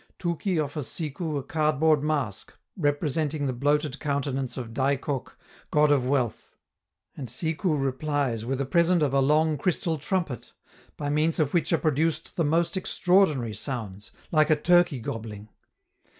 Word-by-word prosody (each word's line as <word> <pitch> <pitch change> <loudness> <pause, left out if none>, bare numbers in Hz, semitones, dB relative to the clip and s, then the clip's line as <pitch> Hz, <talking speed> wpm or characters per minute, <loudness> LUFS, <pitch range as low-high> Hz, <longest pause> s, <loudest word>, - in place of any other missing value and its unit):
Touki 175 +1 -1
offers 145 -3 -3
Sikou 155 0 -3
a 140 - -3
cardboard 155 0 +2
mask 140 -10 -2 0.2
representing 145 -1 0
the 130 - -1
bloated 145 +2 0
countenance 140 -3 -2
of 115 -3 -6
Dai 135 +3 +2
Cok, 135 -1 -5 0.3
god 150 0 +4
of 130 -3 +2
wealth; 130 -4 -1 0.6
and 135 - -6
Sikou 160 - 0
replies 135 -3 -1
with 130 +3 -2
a 140 - 0
present 170 +4 +3
of 140 -2 0
a 140 - +4
long 150 +2 +2
crystal 165 -1 -1
trumpet, 155 - -3 0.4
by 145 -1 -2
means 155 +2 +1
of 150 -3 0
which 170 - +1
are 165 - +4
produced 155 +1 0
the 170 - +1
most 165 +3 +1
extraordinary 180 - +2
sounds, 105 -4 -5 0.2
like 155 -1 +3
a 155 - +5
turkey 175 -2 +3
gobbling. 110 -2 -6
145 Hz, 150 wpm, -26 LUFS, 135-160 Hz, 0.6 s, a